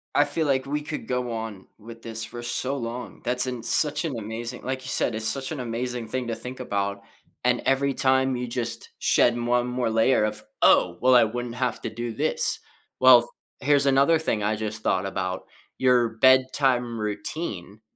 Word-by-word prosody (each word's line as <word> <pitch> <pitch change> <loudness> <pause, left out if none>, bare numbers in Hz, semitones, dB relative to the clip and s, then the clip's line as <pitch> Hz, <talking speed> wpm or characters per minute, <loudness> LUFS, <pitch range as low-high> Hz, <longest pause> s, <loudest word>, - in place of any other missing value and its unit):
I 145 - +6
feel 155 +2 -2
like 130 -2 +1
we 145 +2 -2
could 150 +1 -6
go 125 -1 -2
on 110 -4 -6
with 115 +1 -12
this 115 -1 -5
for 120 +2 -7
so 130 +3 -2
long. 120 0 -6
That's 125 +1 +1
an 125 -3 -5
such 150 +5 +1
an 140 -7 -3
amazing 115 +3 -6
like 130 0 -3
you 130 - -6
said, 120 - +1
it's 110 0 -1
such 135 +4 -1
an 155 - -4
amazing 120 0 -4
thing 125 +2 -3
to 115 - -2
think 125 +3 -8
about, 100 -4 -2 0.4
and - - +2
every 135 +1 +2
time 130 0 +2
you 125 0 -3
just 115 -1 -4
shed 120 0 +3
one 120 +1 +1
more 125 -1 -1
layer 110 +1 +3
of, 105 0 -3 0.2
"Oh! 85 -1 +4
Well 130 0 +5
I 120 - +7
wouldn't 120 +2 -5
have 125 0 -2
to - - -2
do 120 +1 -5
this." - - -1 0.4
Well, 125 -2 +7 0.3
here's 140 +1 +3
another 140 +4 +4
thing 110 -9 -1
I 105 +1 +1
just 110 +1 -5
thought - - +1
about: 95 -1 -3 0.3
your 125 -2 +3
bedtime 130 0 +3
routine. 105 - -5
120 Hz, 190 wpm, -25 LUFS, 110-130 Hz, 0.4 s, I